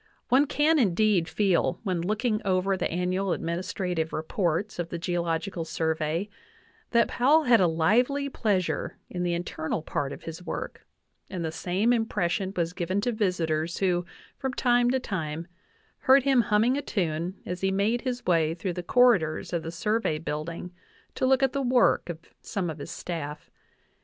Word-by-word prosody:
One 270 +4 +5
can, 305 +2 +3
indeed, 200 -5 +2
feel 195 -3 +1
when 185 -5 -1
looking 215 +4 0
over 190 0 +1
the - - -1
annual 180 +2 0
administrative 170 -1 -2
re 155 - -3
ports 175 +3 -1
of 170 -1 -2
the 170 - -4
Geological 170 +1 -2
Survey 160 +3 -1 0.6
that 235 -1 +4
Powell 295 +6 +4
had 240 -6 +5
a 180 - +5
lively 240 - +2
pleas 205 -9 0
ure - - -3
in 180 - -3
the 175 -1 0
internal 160 -2 -3
part 140 -3 -2
of - - -9
his 165 +1 -7
work, - - -6 0.4
and 180 -4 -4
the 160 - -2
same 190 +8 +1
impression 195 -4 0
was 170 0 0
given 185 +2 -1
to 245 +3 0
visitors 170 -6 -1
who, 180 -2 +1 0.4
from 265 -1 -3
time 245 -1 +3
to 260 +1 +2
time, 165 -8 -4 0.5
heard 265 0 +5
him 270 -3 +4
hum 210 -1 +2
ming 250 +3 +2
a - - -1
tune 175 - -2
as 180 0 -4
he 190 - +2
made 205 +5 +1
his 250 -2 -3
way 165 -2 +2
through 180 +1 -3
the 180 - -4
corridors 185 -7 +3
of 170 - 0
the 160 - -6
Survey 210 0 0
building 165 +3 -5 0.4
to 260 - 0
look 265 +1 +4
at 265 - +2
the 280 - 0
work 250 -7 +3
of 165 -1 -5 0.2
some 185 -6 -3
of 155 - -9
his - - -7
staff. 150 -4 -6
185 Hz, 175 wpm, -27 LUFS, 165-230 Hz, 0.6 s, One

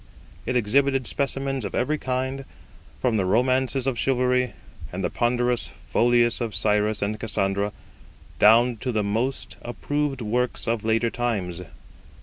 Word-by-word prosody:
It 125 - -1
exhibited 135 +3 +2
specimens 135 0 0
of 100 - -4
every 150 +5 0
kind, 130 +1 -2 0.6
from 120 -4 +1
the 100 - +1
romances 130 +5 +1
of 130 -4 -1
chivalry 125 -2 +1 0.4
and 95 +2 -4
the 90 - -1
ponderous 120 0 +1
folios 120 0 +2
of 115 -3 -3
Cyrus 105 0 +1
and 105 +1 -2
Cassandra, 100 -2 -1 0.7
down 115 +3 +5
to 125 +3 -3
the 110 -2 0
most 115 +6 -2
approved 145 +2 -2
works 120 +3 -1
of 115 -2 0
later 115 +1 +1
times. 100 -8 -2
120 Hz, 135 wpm, -24 LUFS, 110-130 Hz, 0.7 s, down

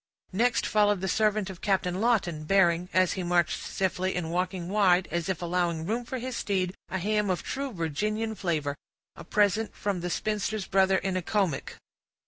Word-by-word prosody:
Next 240 +5 +2
followed 205 -2 +3
the 190 - -2
servant 210 0 +1
of 180 - -12
Captain 190 -2 0
Lawton, 185 -10 +1
bearing, 175 -1 +3
as 185 -1 +3
he 190 - -3
marched 175 -1 +1
stiffly, 185 0 -1
and 165 -2 -2
walking 180 0 -2
wide, 190 -2 +3
as 170 +1 -2
if 180 -2 -2
allowing 170 -2 0
room 230 +5 -2
for 260 - -4
his 255 0 -4
steed, 185 -4 -1 0.2
a 190 - -2
ham 210 +2 0
of 185 - -1
true 275 0 -3
Virginian 210 +6 -2
flavor; 160 -8 -1 0.4
a - - -10
present 210 +4 +1
from 200 -3 -2
the 180 - -2
spinster's 210 +1 -1
brother 190 0 +3
in 190 0 -2
Accomac. 185 -5 -1
190 Hz, 175 wpm, -28 LUFS, 175-210 Hz, 0.4 s, followed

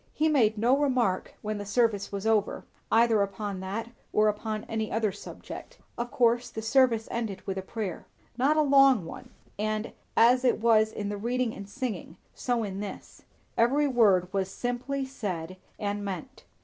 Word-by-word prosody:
He 315 +1 +2
made 225 -8 +3
no 240 +5 +4
remark 255 -9 0
when 215 -1 -3
the - - -4
service 210 -2 +1
was 200 +1 -4
over, 220 -2 +1 0.3
either 225 -2 +4
upon 200 0 -3
that 205 +5 -4 0.2
or 215 0 +4
upon 215 0 -3
any 220 -1 -3
other 220 -2 +1
subject. - - -10 0.2
Of 240 0 -3
course 240 0 +2
the 220 - -6
service 230 -1 +3
ended 220 -5 -4
with 195 - -2
a 190 - -3
prayer. 190 -2 -5 0.3
Not 275 +5 +2
a 310 - +5
long 275 - +5
one; 250 +9 -9 0.3
and 215 +1 -2 0.2
as 250 +2 +6
it 250 - +3
was 220 -1 +4
in 205 -2 -4
the 205 - -3
reading 240 +2 -1
and 200 0 -9
singing, 210 -9 -5 0.2
so 245 -2 -1
in 195 -2 -4
this; 205 -1 -8 0.3
every 275 +6 +3
word 200 -8 +3
was 195 -1 0
simply 250 +5 -3
said 185 -9 -5 0.2
and 205 -1 -2
meant. 200 +7 -6
220 Hz, 175 wpm, -28 LUFS, 200-245 Hz, 0.3 s, as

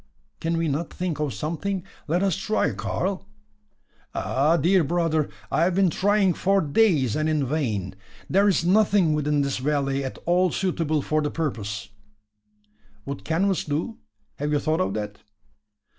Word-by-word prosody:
"Can 165 0 -1
we 165 0 0
not 155 +3 -2
think 180 -4 -3
of 150 -2 -1
something? 175 +6 -3 0.2
Let 175 +5 +1
us 195 -4 +2
try, 215 0 0
Karl!" 190 +1 -3 0.9
"Ah! 150 +6 +2
dear 175 +3 +3
brother, 160 -1 0 0.2
I 165 - +3
have 180 0 +1
been 190 -3 +3
trying 200 +1 +2
for 195 +3 +2
days, 150 - +2
and 155 0 0
in 150 -3 +1
vain. 115 - -2 0.3
There 200 +3 +3
is 185 -4 +2
nothing 195 -3 +4
within 150 -1 +1
this 140 -1 -1
valley 140 0 0
at 130 - -5
all 180 +1 +3
suitable 165 -5 -1
for 155 0 +1
the 150 - -1
purpose." 110 -10 -3 1.2
"Would 140 0 -6
canvas 185 +4 +1
do? 155 +10 -3 0.4
Have 145 +1 -2
you 150 - +3
thought 155 +4 0
of - - -1
that?" 105 -1 -4
160 Hz, 160 wpm, -24 LUFS, 145-185 Hz, 1.2 s, nothing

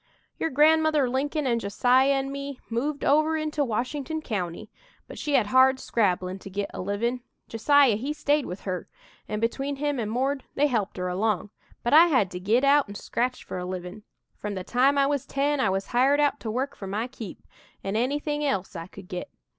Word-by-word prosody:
"Your 325 - 0
grandmother 310 0 +4
Lincoln 285 +4 -1
an' 235 -2 +1
Josiah 250 +6 +3
an' 270 0 -1
me 280 -1 -6
moved 280 +5 -2
over 310 +2 +3
into 310 -1 -1
Washington 270 +6 -2
County, 185 - -4 0.4
but - - -9
she 295 -2 0
had 245 -5 +4
hard 260 +4 +4
scrabblin' 185 -5 0
to 195 - -10
git 200 +1 -3
a - - -5
livin'. 230 +6 -1 0.3
Josiah 265 +1 +4
he 265 +7 -3
stayed 295 -1 +1
with 180 +2 -6
her, 185 -3 -4 0.4
an' 210 - -3
between 270 +5 -1
him 290 -1 -1
an' 215 -2 -2
'Mord,' 265 +4 -1
they 290 - +3
helped 220 -9 -1
her 180 0 -2
along, 200 +1 -1 0.3
but 240 - 0
I 325 +3 +9
had 255 - +2
to 180 - -5
git 220 +8 +2
out 280 -1 +4
and 200 0 -7
scratch 250 +4 -2
for 185 - -6
a 180 - -4
livin'. 180 +2 -6 0.3
From 205 -1 -5
the 185 - -4
time 265 +7 +2
I 275 - +4
was 280 -2 -1
ten 285 +1 0
I 260 - +2
was 195 +1 -1
hired 265 +4 +3
out 290 -1 +2
to 225 - -5
work 265 +5 -2
for 195 - -8
my 210 +4 -2
'keep,' 235 -6 -9 0.4
an' 195 +1 -3
anything 290 +5 -1
else 200 -10 -1
I 165 0 -6
could 180 - -13
git. 180 +11 -5
255 Hz, 205 wpm, -26 LUFS, 205-285 Hz, 0.4 s, I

